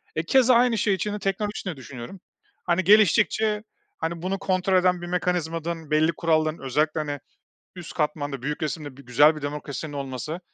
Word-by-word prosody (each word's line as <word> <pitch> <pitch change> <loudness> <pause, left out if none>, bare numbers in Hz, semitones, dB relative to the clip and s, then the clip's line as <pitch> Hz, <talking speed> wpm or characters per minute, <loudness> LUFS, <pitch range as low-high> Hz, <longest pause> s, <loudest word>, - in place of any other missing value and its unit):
E, 155 - 0
keza, 255 +6 +4
aynı 240 -1 +4
şey 205 0 +2
içinde 210 +3 -2
teknoloji 205 +2 -2
de 180 -6 -4
düşünüyorum. 130 +6 -9 0.4
Hani, 175 +1 +1
geliştikçe, 210 +2 +4 0.3
hani, 165 0 -3
bunu 190 +2 -2
kontrol 185 -1 +1
eden 180 -1 +2
bir 175 - -6
mekanizmanın, 165 -3 -2
belli 155 +2 +3
kuralların, 155 -1 +1
özellikle, 150 +4 0
hani, 145 -2 -3 0.6
üst 175 -2 -9
katmanda, 145 -3 -2
büyük 150 +4 -3
resimde 150 -3 -4
bir 140 - -14
güzel 145 +6 +5
bir 155 - -8
demokrasinin 145 +1 -5
olması 140 +3 -5
165 Hz, 165 wpm, -25 LUFS, 150-190 Hz, 0.6 s, güzel